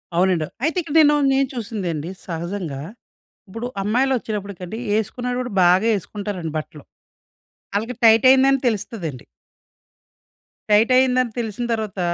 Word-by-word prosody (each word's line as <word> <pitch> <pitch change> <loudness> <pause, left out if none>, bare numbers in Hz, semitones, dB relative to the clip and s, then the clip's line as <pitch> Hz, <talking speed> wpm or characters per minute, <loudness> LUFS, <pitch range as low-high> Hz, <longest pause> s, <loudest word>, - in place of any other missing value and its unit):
అవునండి. 180 -3 +2 0.2
అయితే 320 +4 0
ఇక్కడ 320 -1 -7
నేను 295 -1 +6 0.2
నేను 270 0 +2
చూసిందండి 185 - -4 0.2
సహజంగా. 170 -4 -4 0.7
ఇప్పుడు 225 +5 -6 0.2
అమ్మాయిలు 250 +6 +1
ఒచ్చినప్పటికండి 200 -2 -6
వేసుకున్న 245 +4 -1
కూడా 245 -3 -5
బాగా 185 +5 +4
వేసుకుంటారండి 195 -4 -5
బట్టలు. 150 -1 -9 0.9
ఆళ్ళకి 225 +5 -2
టైట్ 225 +2 +6
అయిందని 270 0 +5
తెలుస్తదండి. 200 - -3 1.5
టైట్ 220 +4 +4
అయిందని 255 -2 +2
తెలిసిన 230 +1 -3
తర్వాత, 215 -4 -4
215 Hz, 115 wpm, -21 LUFS, 185-250 Hz, 1.5 s, నేను